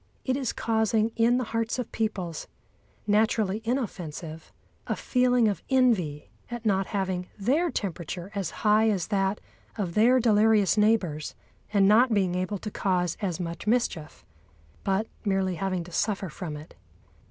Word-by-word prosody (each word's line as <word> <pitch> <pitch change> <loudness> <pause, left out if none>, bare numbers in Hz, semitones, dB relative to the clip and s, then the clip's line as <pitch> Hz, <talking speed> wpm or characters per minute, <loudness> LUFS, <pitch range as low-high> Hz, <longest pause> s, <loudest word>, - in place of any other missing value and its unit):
It 260 - +1
is 265 -3 -1
causing 220 -1 +1
in 235 +1 +3
the 255 - 0
hearts 230 +1 0
of 250 -3 -4
peoples, 190 -7 -3 0.6
naturally 215 -1 +2
inoffensive, 175 - -4 0.4
a - - 0
feeling 250 -2 +2
of 205 - -1
envy 220 - +1 0.2
at 240 -1 -6
not 195 -2 +2
having 190 -3 -2
their 280 - +1
temperature 180 - -4
as 195 -5 -2 0.2
high 215 +1 +5
as 195 -4 -1
that 195 -1 0 0.4
of 185 -5 -2
their 240 +6 +5
delirious 215 -3 +4
neighbours 210 -8 +1 0.4
and 200 -2 +4
not 225 +3 +5
being 190 -3 +1
able 185 +3 -2
to 210 +2 -6
cause 180 -4 0
as 185 -4 -2
much 170 +3 -5
mischief, 215 -10 -1 0.6
but 195 +2 +1 0.2
merely 195 -3 +1
having 185 0 -2
to 175 - -12
suffer 200 0 -1
from 155 -1 -6
it. 150 +2 -12
205 Hz, 150 wpm, -27 LUFS, 180-225 Hz, 0.6 s, high